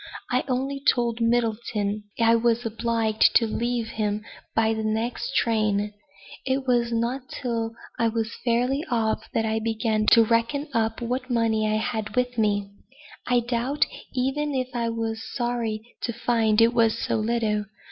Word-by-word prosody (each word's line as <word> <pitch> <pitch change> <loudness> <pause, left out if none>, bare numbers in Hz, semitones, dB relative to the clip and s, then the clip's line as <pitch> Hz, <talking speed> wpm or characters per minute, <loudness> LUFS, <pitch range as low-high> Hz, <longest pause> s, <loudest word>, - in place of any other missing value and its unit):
I 250 +1 +2
only 270 +2 -1
told 240 -4 +2
Middleton 220 -3 0
I 230 0 +5
was 235 +1 +1
obliged 225 -1 +2
to 230 - +6
leave 235 +1 -1
him 210 -1 -2 0.3
by 225 0 +3
the 220 0 -3
next 225 +5 -2
train. 210 -2 +1 0.5
It 265 0 -1
was 240 -2 +2
not 240 +3 -1
till 230 -3 -3 0.2
I 230 - +3
was 225 0 -2
fairly 250 +4 +1
off, 225 -3 0
that 225 - +2
I 220 0 0
began 220 -1 0
to 230 - +7
reckon 235 +7 0
up 225 -1 0
what 255 +2 -2
money 220 -3 +1
I 215 - +2
had 220 -1 -3
with 250 -1 0
me. 205 -2 +1 0.6
I 245 -1 +3
doubt 240 +4 0 0.3
even 270 +3 -1
if 255 -1 -1
I 235 -1 -1
was 225 -1 -3
sorry 235 -3 -1 0.2
to 235 - -1
find 230 -2 +2
it 230 +1 +5
was 230 -2 +3
so - - -1
little. 215 -1 0
230 Hz, 155 wpm, -25 LUFS, 220-245 Hz, 0.6 s, to